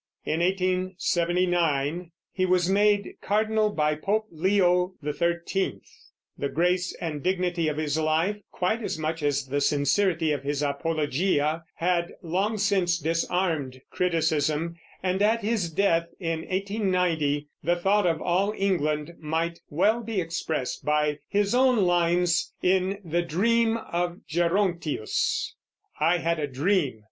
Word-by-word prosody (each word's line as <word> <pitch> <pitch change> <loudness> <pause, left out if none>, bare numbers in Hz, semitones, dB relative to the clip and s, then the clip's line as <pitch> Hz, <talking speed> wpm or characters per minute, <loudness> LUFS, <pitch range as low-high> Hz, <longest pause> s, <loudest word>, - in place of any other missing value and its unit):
In 160 - 0
1879 175 -3 0 0.2
he 185 - -1
was 180 -1 +3
made 205 +1 +2
cardinal 215 +1 +1
by 150 -6 +1
Pope 205 +8 -1
Leo 180 +1 +2
XIII. 170 +5 -1 0.6
The 140 - -1
grace 180 +3 0
and 155 -4 -4
dignity 180 -2 0
of 150 -1 -1
his 155 0 -1
life, 160 +6 +1
quite 220 +6 -1
as 210 - -3
much 160 +1 -3
as 145 -1 0
the 140 +2 -1
sincerity 155 +4 +2
of 145 -3 -1
his 145 +1 -2
Apologia, 155 +1 0
had 170 0 0
long 195 +6 0
since 195 -4 +2
disarmed 165 -4 -1
criticism, 160 -2 0 0.3
and 185 +1 0
at 220 +2 +2
his 210 -5 0
death, 170 -1 +2
in 165 -2 -2
1890, 180 -7 0
the 175 +1 +2
thought 195 +2 +2
of 165 -2 +1
all 195 +4 +1
England 155 -5 0
might 165 +2 -2
well 210 +10 +2
be 225 -3 -2
expressed 165 -5 -3
by 150 0 +1
his 205 +1 +1
own 250 -4 +4
lines 175 0 +2
in 190 +1 +2
"The 170 +1 0
Dream 225 +7 +2
of 175 -4 -3
Gerontius": 170 - 0 0.5
I 165 +3 +3
had 165 -1 -1
a 145 - -1
dream. 145 - 0
175 Hz, 130 wpm, -26 LUFS, 155-190 Hz, 0.6 s, own